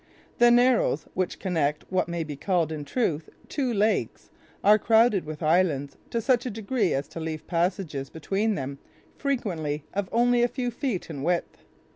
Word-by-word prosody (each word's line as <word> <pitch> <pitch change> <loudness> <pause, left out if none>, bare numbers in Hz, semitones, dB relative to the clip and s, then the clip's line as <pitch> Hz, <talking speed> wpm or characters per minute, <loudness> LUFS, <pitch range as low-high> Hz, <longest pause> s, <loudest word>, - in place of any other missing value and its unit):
The 240 0 +7
narrows, 240 - +3
which 185 -1 -2
connect 155 -6 -1
what 185 -1 +1
may 170 -1 -2
be 150 -2 -6
called, 170 +1 0
in 150 -2 -5
truth, 160 - -1 0.2
two 265 -4 -1
lakes, 215 0 0 0.3
are 210 +1 +6
crowded 225 -3 +4
with 155 +1 -6
islands 155 -4 +2
to 235 - -1
such 245 +1 +2
a - - -1
degree 220 -1 -1
as 140 +1 -1
to - - -7
leave 160 -1 -5
passages 170 -5 -1
between 200 +7 -1
them 140 0 -5 0.4
frequently 170 - -2
of 195 -1 -2
only 240 +1 +3
a 240 - +4
few 245 0 -3
feet 235 - -3
in 140 -3 -6
width. 170 +3 -1
185 Hz, 170 wpm, -26 LUFS, 155-230 Hz, 0.4 s, The